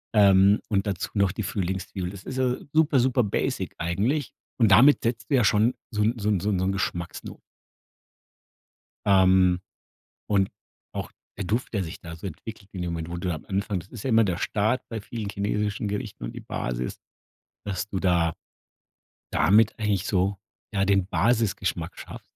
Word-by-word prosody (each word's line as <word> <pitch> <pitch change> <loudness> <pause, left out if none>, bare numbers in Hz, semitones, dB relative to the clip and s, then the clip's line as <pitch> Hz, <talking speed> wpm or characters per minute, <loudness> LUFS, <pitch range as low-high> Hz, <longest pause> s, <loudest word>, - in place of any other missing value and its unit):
ähm, 100 0 +6
und 100 -1 +1
dazu 95 -4 -2
noch 100 -2 +3
die 110 - -3
Frühlingszwiebel. 95 -1 -3
Das 95 -1 -10
ist 130 - -6
ja 125 -1 +1 0.2
super, 155 -3 +4
super 125 0 +3
basic 100 - -2
eigentlich 105 - 0 0.3
und 110 -4 +5
damit 135 +8 +7
setzt 115 0 -2
du 140 - +5
ja 125 - +4
schon 110 +4 +3 0.2
so 105 - 0
'n 115 +3 +1
so 105 0 0
'n 100 -3 +2
so 100 +5 -1
'n 100 - +1
so 95 - +1
'n 95 - +1
Geschmacksno 85 -3 -4 1.7
Ähm, 95 -2 +5 0.7
und 95 -2 +3 0.4
auch - - -5 0.3
der 100 - -3
Duft, 115 +7 -1
der 100 -3 0
sich 80 - -7
da 85 -1 -8
so 85 +4 -6
entwickelt 100 +3 -9
in 95 - -5
dem 90 -1 -2
Moment, 80 0 -4
wo - - -6
du 90 +1 -2
dann 80 -3 -3
am - - -23
Anfang 100 -1 -1
das 90 +3 -13
ist 120 -5 -9
ja 135 - -1
immer 115 -1 +5
der 90 -4 0
Start 110 +6 0
bei 115 - -4
vielen 110 -1 -5
chinesischen 105 +1 -1
Gerichten 100 -10 -5
und - - -6
die - - -8
Basis, - - -4 0.7
dass 100 0 -3
du 95 - -2
da 85 -3 +2 1.0
damit 105 +2 +4
eigentlich 105 -3 0
so 95 0 +1 0.4
ja 100 -1 +2
den 100 -2 +2
Basisgeschmack 105 +2 0
schaffst - - -9
100 Hz, 185 wpm, -26 LUFS, 95-110 Hz, 1.7 s, damit